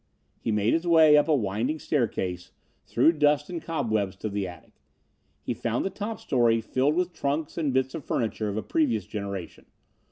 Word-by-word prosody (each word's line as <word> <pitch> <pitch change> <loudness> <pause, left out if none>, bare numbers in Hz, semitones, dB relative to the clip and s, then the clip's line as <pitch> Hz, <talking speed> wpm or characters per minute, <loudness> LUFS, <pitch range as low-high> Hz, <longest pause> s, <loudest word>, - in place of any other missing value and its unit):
He 115 - -2
made 105 +1 +2
his 165 +2 0
way 160 -3 +7
up 150 +1 +4
a 155 - +4
winding 115 +5 -1
staircase, 95 - -2 0.4
through 160 - +4
dust 150 +2 +2
and 170 -2 -4
cobwebs 110 - -1
to 110 +3 -4
the 100 -1 -2
attic. 90 -3 -12 0.7
He - - -2
found 120 0 -2
the 195 - -1
top 210 +3 -5
story 120 -4 +2
filled 130 +6 0
with 180 0 0
trunks 145 +2 -2
and 155 -4 0
bits 130 0 0
of 160 - -6
furniture 110 -3 -2
of 100 - -4
a 110 - -2
previous 115 - 0
generation. 100 -4 -6
130 Hz, 185 wpm, -26 LUFS, 105-155 Hz, 0.7 s, way